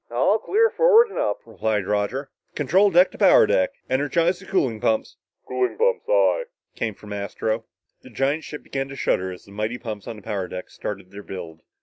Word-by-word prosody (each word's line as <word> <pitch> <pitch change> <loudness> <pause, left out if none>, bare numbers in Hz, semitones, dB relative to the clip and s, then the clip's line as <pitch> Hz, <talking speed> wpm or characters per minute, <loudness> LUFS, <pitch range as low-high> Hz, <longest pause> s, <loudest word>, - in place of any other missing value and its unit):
"All 130 - +2
clear 450 - +2
forward 470 -1 +5
and - - -4
up," 105 - -1
replied 110 -2 -1
Roger. 105 +7 -1 0.2
"Control 185 +8 +3
deck 180 +1 +5
to - - -13
power - - +7
deck... 95 - +2 0.2
energize 165 +7 +1
the 190 - -14
cooling 125 - 0
pumps!" 110 -1 0 0.3
"Cooling 125 0 -1
pumps, 485 +1 +1
aye," - - +3 0.3
came 110 -3 -3
from 105 0 -9
Astro. 110 +3 -3 0.4
The - - -14
giant 135 +7 0
ship 150 - -8
began 135 0 -3
to 135 - -9
shudder 95 -8 0
as 90 - -11
the 100 - -16
mighty 110 +4 -3
pumps 110 -5 -7
on - - -5
the 105 - -13
power 100 -4 -3
deck 90 0 -8
started 100 -3 -6
their 100 +1 -9
build. 85 -5 -8
115 Hz, 200 wpm, -23 LUFS, 105-165 Hz, 0.4 s, power